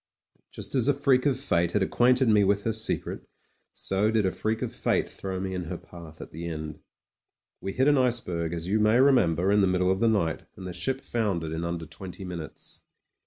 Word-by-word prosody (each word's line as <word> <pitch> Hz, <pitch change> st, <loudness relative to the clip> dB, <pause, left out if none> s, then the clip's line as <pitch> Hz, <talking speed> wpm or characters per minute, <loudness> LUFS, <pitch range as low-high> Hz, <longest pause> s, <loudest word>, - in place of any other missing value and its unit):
Just -, -, -7 dB
as 130 Hz, -2 st, +3 dB
a 145 Hz, -, +4 dB
freak 135 Hz, -1 st, +3 dB
of 135 Hz, -2 st, +1 dB
fate 85 Hz, -10 st, +1 dB
had 105 Hz, -, +2 dB
acquainted 125 Hz, +5 st, +3 dB
me 105 Hz, -2 st, +5 dB
with 100 Hz, +1 st, +2 dB
her 115 Hz, -, 0 dB
secret; 110 Hz, 0 st, -2 dB, 0.4 s
so 100 Hz, +3 st, 0 dB
did 110 Hz, -2 st, +2 dB
a 95 Hz, -, +2 dB
freak 110 Hz, +3 st, -2 dB
of -, -, -4 dB
fate -, -, 0 dB
throw 95 Hz, -1 st, -3 dB
me 95 Hz, 0 st, -3 dB
in 90 Hz, -1 st, -3 dB
her -, -, -5 dB
path 85 Hz, -3 st, -12 dB
at -, -, -9 dB
the 85 Hz, +2 st, -6 dB
end.... 80 Hz, -2 st, -6 dB, 0.8 s
We 95 Hz, -, -4 dB
hit 130 Hz, +2 st, +2 dB
an 145 Hz, -2 st, +5 dB
iceberg, 90 Hz, -10 st, 0 dB
as 85 Hz, 0 st, -4 dB
you 105 Hz, +3 st, +2 dB
may 110 Hz, +3 st, +4 dB
remember, 100 Hz, -, +4 dB
in 105 Hz, 0 st, +4 dB
the 95 Hz, -, +4 dB
middle 90 Hz, 0 st, +2 dB
of 95 Hz, -, 0 dB
the 115 Hz, -, +3 dB
night, 85 Hz, -8 st, 0 dB
and 95 Hz, -, -9 dB
the 90 Hz, -, -5 dB
ship 130 Hz, +10 st, -1 dB
foundered 95 Hz, -9 st, -2 dB
in 80 Hz, +1 st, -3 dB
unider 85 Hz, -1 st, -4 dB
twenty 95 Hz, +2 st, -9 dB
minutes. 85 Hz, -4 st, -7 dB
95 Hz, 215 wpm, -27 LUFS, 85-115 Hz, 0.8 s, me